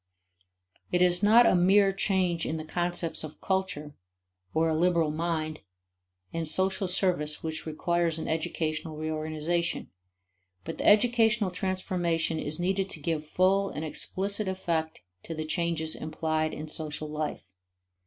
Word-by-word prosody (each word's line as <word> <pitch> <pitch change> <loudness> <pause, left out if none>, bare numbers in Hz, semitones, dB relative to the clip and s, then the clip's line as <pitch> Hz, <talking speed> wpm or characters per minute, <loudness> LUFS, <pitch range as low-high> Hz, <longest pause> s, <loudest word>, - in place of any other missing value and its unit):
It 180 - +3
is 180 0 +3
not 225 +4 +7
a - - +5
mere 195 +2 +5
change 185 -4 0
in 160 - -2
the 155 - -6
concepts 175 0 -1
of 155 -1 -8
culture 190 -6 -2 0.6
or 160 +1 +2
a 160 - +1
liberal 170 -2 +2
mind 155 -1 -2 0.7
and 165 -1 -2
social 190 +4 +1
service 175 -5 +1
which 160 0 -4
requires 170 +1 0
an 160 - -4
educational 155 0 -2
reorganization; 155 +2 -2 0.7
but - - -6
the - - 0
educational 220 -2 +4
transformation 175 -3 -1
is 155 +2 -4
needed 190 +2 0
to 160 - -3
give 155 0 -2
full 195 +4 +2
and 155 - -5
explicit 200 +6 -2
effect 170 -4 -2 0.2
to 165 - -6
the 155 0 -3
changes 160 -1 -1
implied 155 0 -1
in 155 - -6
social 155 0 -2
life. 150 -11 -5
165 Hz, 140 wpm, -28 LUFS, 155-185 Hz, 0.7 s, not